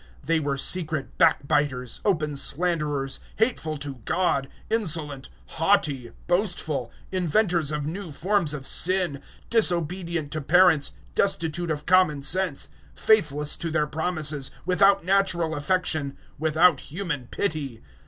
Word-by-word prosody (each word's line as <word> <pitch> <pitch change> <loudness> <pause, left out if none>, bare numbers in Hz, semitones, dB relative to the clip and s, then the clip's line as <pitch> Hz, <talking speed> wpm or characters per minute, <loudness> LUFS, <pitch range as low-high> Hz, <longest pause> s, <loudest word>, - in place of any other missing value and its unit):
001:030 - - -18
They 165 -1 +2
were 140 -2 -2
secret 155 -1 -1
backbiters, 140 -5 +1
open 155 -7 0
slanderers; 150 -3 0 0.2
hateful 210 -9 0
to 140 -4 -7
God, 170 -7 0 0.2
insolent, 155 -10 0 0.2
haughty, 155 -8 0 0.2
boastful; 175 - -1 0.2
inventors 180 -3 +1
of 150 -1 -3
new 170 +2 -6
forms 170 -1 0
of 135 -2 -8
sin, 180 -6 +2 0.3
disobedient 170 -6 0
to 155 - -3
parents, 160 -1 +4 0.2
destitute 170 -3 0
of 150 -1 -3
common 165 -5 +3
sense, 180 -1 +1 0.3
001:031 - - -16
faithless 150 -9 +2
to 165 - -3
their 155 -1 +1
promises, 155 -3 -1 0.2
without 195 +1 +3
natural 185 -4 +1
affection, 150 -3 -1 0.2
without 160 0 +3
human 150 -6 -5
pity. 145 - -4
160 Hz, 125 wpm, -25 LUFS, 145-180 Hz, 0.3 s, parents